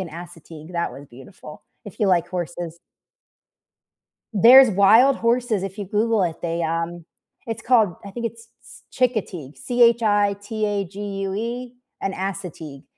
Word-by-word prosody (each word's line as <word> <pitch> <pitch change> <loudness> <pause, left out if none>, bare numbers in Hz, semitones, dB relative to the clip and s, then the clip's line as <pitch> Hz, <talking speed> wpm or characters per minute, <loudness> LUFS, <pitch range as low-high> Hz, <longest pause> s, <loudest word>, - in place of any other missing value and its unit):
and 180 -3 -6
Assateague, 165 -1 -11
that 170 -1 -2
was 140 - -11
beautiful, 150 +4 -13 0.2
if 205 - -12
you 210 - +3
like 175 -2 +2
horses. 175 -2 -5 1.5
There's 245 +5 +8
wild 220 +8 +5
horses, 235 -3 0
if 195 +1 -6
you 205 - -5
google 215 +1 +1
it, 165 -2 -2
they, 170 0 -2
um 165 +1 -3 0.4
it's 225 -1 -5
called 220 -7 +3
I - - -7
think 235 +3 -5
it's 230 0 -7 0.2
S - - -16
Chincoteague, 195 - -2
C-H-I-T-A-G-U-E, 205 -1 0 0.3
and 195 - -2
Assateague, 170 -7 -6
195 Hz, 130 wpm, -22 LUFS, 170-230 Hz, 1.5 s, There's